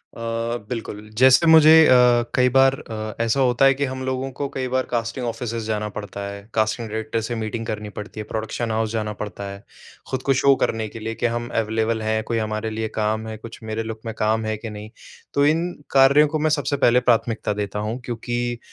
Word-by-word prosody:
अ, - - -11 0.5
बिल्कुल, 110 -3 -6
जैसे 130 +6 +6
मुझे 160 -1 +8 0.2
अ, - - +6 0.4
कई 125 0 +4
बार 135 0 +6
अ, 110 -1 -6
ऐसा 115 +4 +1
होता 125 +1 +3
है 135 - +6
कि 140 +1 -1
हम 130 0 -5
लोगों 130 +1 -2
को 140 - -1
कई 130 -1 -2
बार 130 0 +1
कास्टिंग 120 +1 -2
ऑफ़िसेज़ 115 -1 -4
जाना 105 -1 -1
पड़ता 100 -1 -6
है। 100 0 -8
कास्टिंग 110 +1 0
डायरेक्टर 110 +1 -2
से 120 - -3
मीटिंग 115 +1 -4
करनी 105 -2 -4
पड़ती 105 +1 -7
है, 105 - -3
प्रोडक्शन 110 +1 -3
हाउस 110 0 -1
जाना 110 -2 -2
पड़ता 100 -1 -6
है। 100 - -9 0.5
ख़ुद 130 0 -1
को 135 - +3
शो 140 0 +6
करने 110 -1 -1
के 115 - -9
लिए 115 +1 -4
कि - - -2
हम 120 0 -3
अवेलेबल 110 +1 -1
हैं 110 0 0
कोई 115 -1 -2
हमारे 110 0 -2
लिए 110 0 -3
काम 110 +1 -1
है, 110 - -5
कुछ 115 +2 -11
मेरे 110 +1 -3
लुक 110 0 -6
में 115 - -4
काम 110 +1 +1
है 110 - -1
के 115 +1 -7
नहीं? 105 0 -8 0.4
तो 140 0 +3
इन 165 +4 +2 0.2
कार्यों 140 +2 +6
को 155 +1 -2
मैं 155 +1 +2
सबसे 145 -1 0
पहले 120 +1 +5
प्राथमिकता 115 -2 +1
देता 105 0 -3
हूँ 120 +4 -3
क्योंकि 120 0 -3
115 Hz, 220 wpm, -22 LUFS, 110-130 Hz, 0.5 s, मुझे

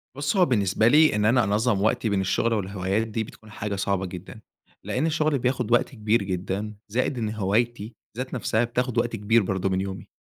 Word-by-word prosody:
بُصّ، 145 +4 -1
هو 180 - +6
بالنسبة 105 -3 +2
لي 150 +1 +5
إن 105 0 +1
أنا 120 +2 +4
أنظم 105 +1 +1
وقتي 110 +1 +1
بين 100 -1 +1
الشغل 115 +4 +1
والهوايات 100 +1 -1
دي 110 0 -2
بتكون 110 0 -14
حاجة 105 0 -4
صعبة 100 -1 -1
جدًا، 95 +4 -9 0.4
لأن 130 +5 -1
الشغل 155 -3 +1
بياخد 125 -2 -1
وقت 120 - +3
كبير 110 -3 0
جدًا، 95 +3 -3
زائد 125 +5 -1
إن 110 -3 -1
هوايتي 110 +2 -1 0.2
ذات 130 +1 -4
نَفسها 115 -2 0
بتاخد 120 0 -2
وقت 120 0 +1
كبير 110 +1 +2
برضو 95 0 -1
من 95 0 0
يومي. 95 -1 -6
110 Hz, 195 wpm, -25 LUFS, 100-120 Hz, 0.4 s, هو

